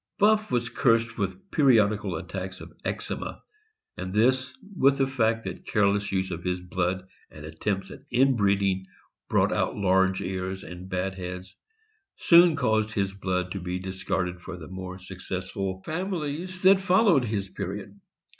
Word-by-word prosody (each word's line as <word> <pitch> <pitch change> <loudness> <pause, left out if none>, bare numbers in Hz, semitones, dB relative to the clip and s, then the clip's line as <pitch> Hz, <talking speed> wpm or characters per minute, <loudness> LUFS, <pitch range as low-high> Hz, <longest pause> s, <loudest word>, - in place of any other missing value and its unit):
Buff 215 +1 +3
was 120 -1 +1
cursed 115 -1 +2
with 95 -2 -4
periodical 110 - +3
attacks 95 +2 -5
of - - -11
eczema, - - -4 0.5
and 95 - -5
this, 130 +5 +2 0.2
with 140 -3 +4
the 135 - +3
fact 115 -4 +1
that - - -7
careless 100 -1 +2
use 95 -1 -1
of 85 0 -5
his 90 0 -1
blood 90 +1 -2 0.2
and 75 0 -11
attempts 95 +5 -3
at - - -10
inbreeding 100 -7 +2 0.4
brought - - +3
out - - 0
large 95 -1 +3
ears 95 +1 -4
and 90 +1 -9
bad 95 0 -1
heads, 90 0 -7 0.6
soon 170 -1 +6
caused 110 -5 +1
his 100 -2 0
blood 90 -2 -2
to 100 - -3
be 90 0 -3
discarded 90 -1 -3
for 90 +1 -7
the 80 -3 -9
more 95 0 -6
successful 95 +1 -5
families 180 +1 -3
that 190 +1 +7
followed 190 - +4
his 105 -3 -2
period. 100 +1 -6
100 Hz, 150 wpm, -27 LUFS, 95-120 Hz, 0.6 s, that